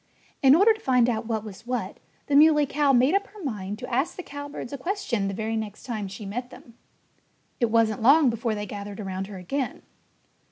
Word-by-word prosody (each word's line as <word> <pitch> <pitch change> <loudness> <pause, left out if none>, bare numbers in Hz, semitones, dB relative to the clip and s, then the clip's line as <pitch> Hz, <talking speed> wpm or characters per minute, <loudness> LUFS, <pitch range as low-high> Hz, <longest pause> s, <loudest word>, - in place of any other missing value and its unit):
In 270 +1 +7
order 405 +6 +6
to 435 - -11
find 250 - +3
out 225 -2 -1
what 220 -2 -2
was 215 +2 -11
what, 250 0 -3 0.3
the 285 - 0
Muley 300 0 +6
Cow 285 0 +2
made 260 +4 +4
up 400 +1 +1
her 415 -2 -13
mind 210 -7 -4
to 250 +2 -7
ask 275 +8 0
the 365 - -7
cowbirds 285 -3 -7
a - - -3
question 280 - -2
the 195 - -3
very 220 +2 -2
next 215 -2 -5
time 215 -5 -4
she 200 +2 -8
met 245 +5 -5
them. 235 - -14 0.9
It 235 -3 +2
wasn't 225 -1 +2
long 275 +2 +6
before 230 -1 -2
they 205 0 -4
gathered 205 0 -7
around 190 -1 -4
her 200 -2 -8
again. 255 +9 -4
240 Hz, 210 wpm, -25 LUFS, 210-285 Hz, 0.9 s, In